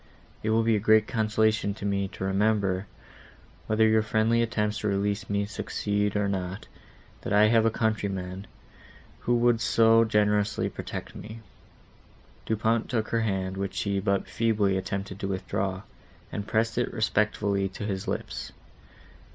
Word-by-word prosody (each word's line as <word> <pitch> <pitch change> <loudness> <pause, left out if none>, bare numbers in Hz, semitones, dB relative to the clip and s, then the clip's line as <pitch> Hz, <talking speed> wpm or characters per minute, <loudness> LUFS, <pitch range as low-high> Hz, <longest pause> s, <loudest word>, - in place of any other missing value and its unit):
It 110 - -2
will 115 +1 +3
be 115 0 +3
a - - +1
great 110 +1 +4
consolation 110 -2 +1
to 100 - -7
me 100 -1 0
to 95 - -8
remember, 100 -1 +1 0.8
whether 110 +1 +3
your 110 0 +4
friendly 110 +2 +2
attempts 105 -3 -1
to 105 - -2
release 100 +2 -1
me 100 0 0
succeed 105 0 -2
or 105 -1 +1
not, 95 0 -3 0.6
that - - -5
I 105 +1 +5
have 115 0 +4
a - - +5
countryman, 100 -4 -2 0.7
who 120 - +1
would 120 -1 +3
so 115 0 +5
generously 105 -1 +1
protect - - -6
me."—Monsieur 110 +1 -9 1.0
Du 110 - +1
Pont 115 +1 0
took 110 -3 -1
her 115 - +1
hand, 95 -3 -2
which 100 0 -3
she 100 -1 0
but 100 0 0
feebly 105 -4 +1
attempted 95 0 -4
to 95 - -3
withdraw, 95 0 -2 0.5
and 100 0 -4
pressed 110 +2 +1
it 120 - -1
respectfully 105 -3 0
to 100 +2 -6
his 95 -2 -3
lips. - - -4
105 Hz, 155 wpm, -27 LUFS, 100-110 Hz, 1.0 s, I